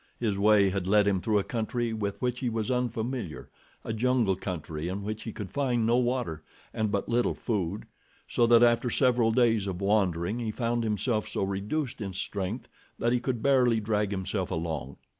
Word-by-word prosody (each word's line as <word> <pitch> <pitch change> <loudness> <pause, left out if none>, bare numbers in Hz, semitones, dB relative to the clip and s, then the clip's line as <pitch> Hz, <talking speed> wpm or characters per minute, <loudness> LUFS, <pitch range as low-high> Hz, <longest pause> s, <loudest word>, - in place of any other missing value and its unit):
His 110 -4 0
way 100 -1 +4
had 95 -1 -2
led 105 +1 +4
him 95 -2 +2
through 110 +1 +1
a 100 - +2
country 115 +1 -2
with 100 -2 -3
which 125 0 0
he 125 - -1
was 115 +1 -2
unfamiliar, 120 - -3 0.3
a - - -3
jungle 115 -3 +2
country 80 -4 -5
in 95 +3 -3
which 110 +1 -4
he 115 - -4
could 105 -2 -7
find 125 -5 +1
no 120 +2 +3
water, 120 - -1 0.3
and 110 -1 0
but 100 - -1
little 120 +1 +1
food, 100 -3 -2 0.4
so 120 - +2
that 120 0 +6
after 120 +1 +3
several 125 -3 +3
days 115 -4 +3
of 90 -2 -3
wandering 100 0 +1
he 115 -2 -2
found 115 +1 -1
himself 110 +1 0
so - - -2
reduced 105 +8 -2
in 95 -2 -4
strength 100 +4 -4 0.3
that 120 +1 +1
he 125 - +2
could 120 -2 -3
barely 125 -4 +4
drag 105 -1 0
himself 95 -1 -2
along. 80 -5 -4
110 Hz, 190 wpm, -28 LUFS, 100-120 Hz, 0.4 s, that